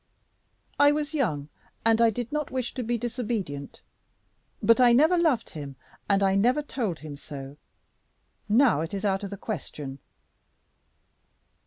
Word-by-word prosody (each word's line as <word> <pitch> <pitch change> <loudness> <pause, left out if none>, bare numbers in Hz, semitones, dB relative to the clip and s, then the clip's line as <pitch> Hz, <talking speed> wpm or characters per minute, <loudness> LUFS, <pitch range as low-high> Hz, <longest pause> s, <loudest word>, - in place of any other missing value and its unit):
"I 285 0 +7
was 300 +1 -2
young, 155 - -1 0.4
and 225 0 +4
I 230 - +6
did 235 +1 -4
not 300 -1 -2
wish 255 -2 -3
to 255 - -3
be 240 0 -1
disobedient. 220 - -4 0.8
But 230 +2 +4
I 240 -1 +7
never 310 +8 +5
loved 320 -9 +1
him, 145 -3 -7 0.3
and 200 0 +3
I 195 0 +3
never 245 +9 +3
told 225 - -3
him 145 -2 -7
so. 140 -1 -9 0.9
Now 230 - +4
it 165 +4 -4
is 195 +1 -3
out 195 0 0
of 200 - -4
the 200 - -7
question." 145 -9 -6
225 Hz, 150 wpm, -27 LUFS, 165-255 Hz, 0.9 s, I